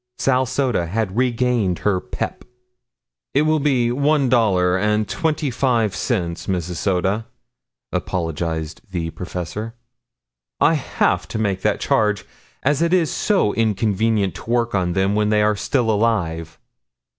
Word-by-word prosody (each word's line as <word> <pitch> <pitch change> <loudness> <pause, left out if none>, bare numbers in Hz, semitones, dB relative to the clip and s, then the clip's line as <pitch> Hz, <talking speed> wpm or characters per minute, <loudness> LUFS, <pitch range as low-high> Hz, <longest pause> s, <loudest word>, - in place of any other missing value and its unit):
Sal 130 -1 +2
Soda 125 -10 0
had 105 +1 -2
regained 120 -6 +1
her 100 -3 +3
pep. - - -5 0.9
"It 145 - +4
will 155 0 +2
be 130 -5 +2
one 140 +1 +2
dollar 95 -7 +3
and 105 +2 +1
twenty 155 - -1
five 115 -5 +1
cents, 85 -1 -2
Mrs. 90 -2 -2
Soda," 95 +5 0 0.6
apologized 80 -2 -3
the 85 -3 -3
professor. 90 +6 -5 0.8
"I 160 - +5
have 150 -4 0
to - - -4
make 100 -3 -1
that - - +1
charge 105 -3 +1 0.4
as 145 +2 +2
it 170 +1 +2
is 175 -4 +3
so 190 - +1
inconvenient 110 -1 +1
to - - -10
work 120 -1 +1
on 90 -3 0
them 95 +2 +1
when 105 0 +1
they 105 0 +3
are 105 0 +3
still 115 +2 0
alive." 90 -8 0
105 Hz, 140 wpm, -21 LUFS, 95-125 Hz, 0.9 s, I